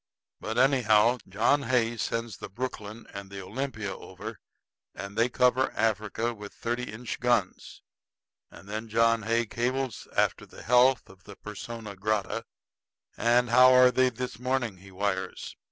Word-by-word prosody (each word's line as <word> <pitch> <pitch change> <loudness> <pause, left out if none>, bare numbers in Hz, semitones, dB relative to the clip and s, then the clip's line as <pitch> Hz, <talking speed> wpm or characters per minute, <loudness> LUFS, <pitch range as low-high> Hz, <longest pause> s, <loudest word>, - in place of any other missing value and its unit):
But 110 +2 -4
anyhow, 125 -3 +4
John 115 +9 +2
Hay 120 -3 +1
sends 115 0 -3
the - - -8
Brooklyn 110 0 -6
and 100 -1 -7
the 100 0 -7
Olympia 110 0 -4
over, - - -9 0.6
and 100 0 -7
they 115 +2 +2
cover 125 +1 +2
Africa 110 +1 0
with 105 -2 -10
thirty 120 +1 -3
inch 115 +2 -6
guns. 120 -6 -1 0.7
And 95 - -15
then 110 +2 -5 0.3
Hay 115 +2 +1
cables 125 +2 -2
after - - +1
the - - -13
health 125 +1 +4
of 95 0 -18
the 100 - -11
persona 105 +1 -8
grata. 100 +1 -1 0.7
'And 120 +1 +2
how 130 +1 +7
are 125 0 +7
they 130 0 +3
this 125 -2 -6
morning?' 125 -5 -1
he 95 +2 -15
wires. 95 -1 -3
115 Hz, 145 wpm, -28 LUFS, 105-125 Hz, 0.7 s, how